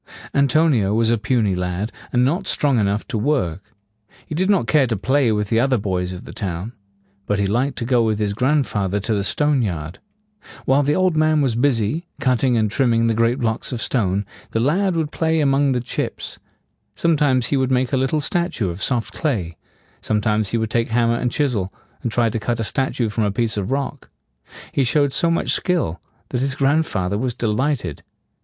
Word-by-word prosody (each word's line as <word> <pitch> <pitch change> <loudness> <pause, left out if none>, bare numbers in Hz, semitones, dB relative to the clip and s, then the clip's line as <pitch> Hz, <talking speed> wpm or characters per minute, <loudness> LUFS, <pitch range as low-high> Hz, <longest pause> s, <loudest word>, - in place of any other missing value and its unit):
An 140 0 +3
to 155 +5 +3
ni 125 -10 +3
o 100 +2 0
was 115 0 +2
a 115 - +3
puny 110 -3 +1
lad, 90 +4 -2 0.2
and 125 0 +3
not 175 +8 0
strong 140 -5 +2
enough 100 0 0
to 115 -6 -1
work. 105 - 0 0.6
He - - -7
did 185 +5 0
not 195 - +3
care 135 +3 +3
to 115 -3 -1
play 130 +3 +2
with 105 -1 -1
the 115 - +2
other 130 +1 +2
boys 90 -3 -2
of 90 0 -8
the - - -9
town. 95 +2 -4 0.5
But 105 - +1
he 100 - +1
liked 125 +7 0
to 115 - -2
go 120 -1 +3
with 110 -2 +1
his 105 -1 -1
grandfather 115 -6 0
to 105 +3 -1
the 100 -1 0
stone 145 +5 +1
yard. 85 -6 -4 0.7
While 135 +2 +4
the 145 +1 +1
old 185 -3 +2
man 155 0 +3
was 130 -4 +1
busy, 125 - 0
cutting 125 -1 +2
and 110 -2 +1
trimming 115 -1 +2
the 115 - +2
great 115 +2 +2
blocks 115 -2 -2
of 125 - -3
stone, 100 -5 0 0.2
the 115 - -1
lad 175 - +1
would 160 -2 -1
play 160 0 0
among 140 -1 +3
the 125 - +1
chips. 120 - -4 0.6
Sometimes 145 -6 +2
he - - +4
would 130 -1 +1
make 130 0 +1
a - - +3
little 135 +4 +1
statue 145 - 0
of 85 +3 -8
soft 120 -1 -1
clay; 100 - -2 0.5
sometimes 105 -1 0
he 115 - 0
would 110 -1 -2
take 115 -1 +1
hammer 115 0 +2
and 125 0 -1
chisel, 115 -11 0 0.3
and 120 - -2
try 120 0 +2
to 115 0 -2
cut 120 +2 -2
a - - 0
statue 125 +2 -1
from 110 +1 -1
a 100 - 0
piece 110 0 0
of 100 0 -3
rock. 140 +1 -3 0.6
He 140 - +1
showed 140 +1 +2
so 170 - +2
much 165 - +1
skill 165 - 0 0.3
that 125 - -2
his 135 0 0
grandfather 135 - +1
was 125 -1 -2
de - - -3
light 125 +3 0
ed. 80 -5 -6
120 Hz, 210 wpm, -21 LUFS, 105-140 Hz, 0.7 s, While